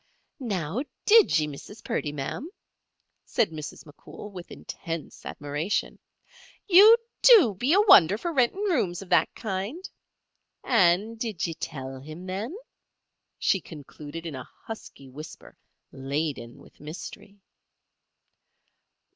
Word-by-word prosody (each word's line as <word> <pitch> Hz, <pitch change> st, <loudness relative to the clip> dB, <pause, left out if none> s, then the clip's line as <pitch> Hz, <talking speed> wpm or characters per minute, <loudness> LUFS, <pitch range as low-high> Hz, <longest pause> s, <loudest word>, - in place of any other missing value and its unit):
"Now, 200 Hz, -, -2 dB, 0.2 s
did 440 Hz, -, +6 dB
ye, 155 Hz, -, +1 dB
Mrs. 150 Hz, +9 st, -10 dB
Purdy, 230 Hz, -, -2 dB
ma'am?" 150 Hz, -, -5 dB, 0.7 s
said 200 Hz, -, 0 dB
Mrs. 155 Hz, 0 st, -8 dB
McCool, 160 Hz, +7 st, -12 dB
with 180 Hz, -3 st, -10 dB
intense 165 Hz, -2 st, -7 dB
admiration. 145 Hz, +6 st, -3 dB, 0.7 s
"You 410 Hz, +5 st, +9 dB, 0.2 s
do 415 Hz, -, +7 dB
be 245 Hz, +9 st, -1 dB
a 400 Hz, -, +6 dB
wonder 205 Hz, -, +7 dB
for 335 Hz, +9 st, -4 dB
rentin' 265 Hz, +8 st, +1 dB
rooms 220 Hz, -, 0 dB
of 185 Hz, -, -16 dB
that -, -, +3 dB
kind. 215 Hz, -, -4 dB, 0.8 s
And 195 Hz, +6 st, +2 dB
did 220 Hz, -7 st, -2 dB
ye 165 Hz, -, -3 dB
tell 135 Hz, -5 st, -7 dB
him, 155 Hz, +6 st, -10 dB
then?" 205 Hz, -, -4 dB, 0.8 s
she 195 Hz, -, +1 dB
concluded 150 Hz, +1 st, -10 dB
in 165 Hz, -, -5 dB
a 130 Hz, -1 st, -8 dB, 0.2 s
husky 220 Hz, -10 st, -9 dB
whisper, 150 Hz, +4 st, -11 dB, 0.4 s
laden 135 Hz, -3 st, -4 dB
with -, -, -18 dB
mystery. 200 Hz, +6 st, -9 dB
185 Hz, 120 wpm, -26 LUFS, 150-230 Hz, 0.8 s, You